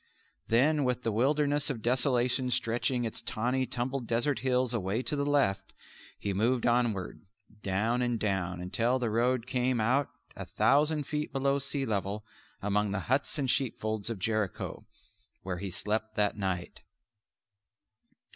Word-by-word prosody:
Then 145 +6 +3
with 125 -1 0
the 115 - 0
Wilderness 145 +5 +2
of 115 -6 -4
Desolation 125 0 +2
stretching 120 +1 0
its 115 - -4
tawny 125 +4 -1
tumbled 125 0 -2
desert 120 +2 +1
hills 125 0 +1
away 110 +2 -1
to 150 - -1
the 140 0 -1
left, 100 -10 +1 0.4
he 100 - -2
moved 115 +5 +1
onward, 120 -6 +1 0.4
down 110 +6 0
and 120 -2 0
down 95 -4 -1
until 115 +8 +1
the 120 -4 -1
road 120 +1 +1
came 125 -1 0
out 130 +6 +2 0.3
a - - -7
thousand 150 +2 +3
feet 150 +1 -3
below 140 0 +1
sea 140 0 -2
level 105 -1 -2 0.4
among 105 +1 +1
the 100 0 -2
huts 140 +3 +1
and 135 -4 +1
sheepfolds 110 -5 -1
of 115 - -3
Jericho, 105 -1 -2 0.6
where 90 -2 -3
he 100 +1 -4
slept 110 +3 -2
that 105 -1 +2
night. 95 -4 -3
120 Hz, 145 wpm, -30 LUFS, 105-130 Hz, 0.6 s, Then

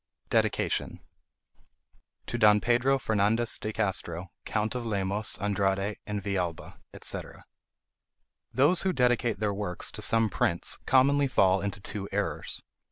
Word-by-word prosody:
DEDICATION - - 0 1.3
TO - - -3
DON 105 -1 +6
PEDRO 120 +4 +2
FERNANDEZ 110 0 +1
DE 110 - -3
CASTRO, 95 -4 -3
COUNT 110 0 -1
OF 125 -1 -3
LEMOS, 100 -1 -2
ANDRADE, 100 0 0
AND 105 -2 -3
VILLALBA, 90 -4 -3 0.2
&c. - - -1 1.3
Those 145 +9 +3
who 190 -1 +1
dedicate 120 - +1
their 105 -1 0
works 100 -3 -3
to - - -7
some 115 0 +3
prince 85 -1 +1
commonly 140 +2 +4
fall 95 -6 +3
into 100 0 -3
two 100 0 -5
errors. 100 +1 -3
105 Hz, 125 wpm, -28 LUFS, 100-120 Hz, 1.3 s, DON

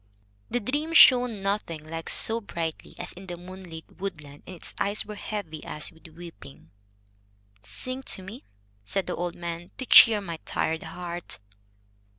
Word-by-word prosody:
The 245 - 0
dream 290 +8 -2
shone 245 -8 +7
nothing 170 -6 -2
like 165 0 -5
so 225 +1 +3
brightly 165 -6 -5
as - - -6
in 190 +1 -11
the 175 -1 -5
moonlit 180 -2 -9
woodland, 150 -7 -6
and 185 - -7
its 170 - -5
eyes 205 +1 0
were 210 - -7
heavy 200 -7 -5
as 150 - -2
with 160 0 -16
weeping. 160 - -12 0.9
"Sing 255 - -3
to 190 -7 -5
me," 210 +7 -9 0.4
said 190 - -1
the - - -2
old 175 0 -3
man, 170 0 -5
"to 260 - -4
cheer 225 -2 +9
my 170 -5 -5
tired 160 0 -1
heart." 175 - -5
175 Hz, 160 wpm, -27 LUFS, 160-210 Hz, 0.9 s, cheer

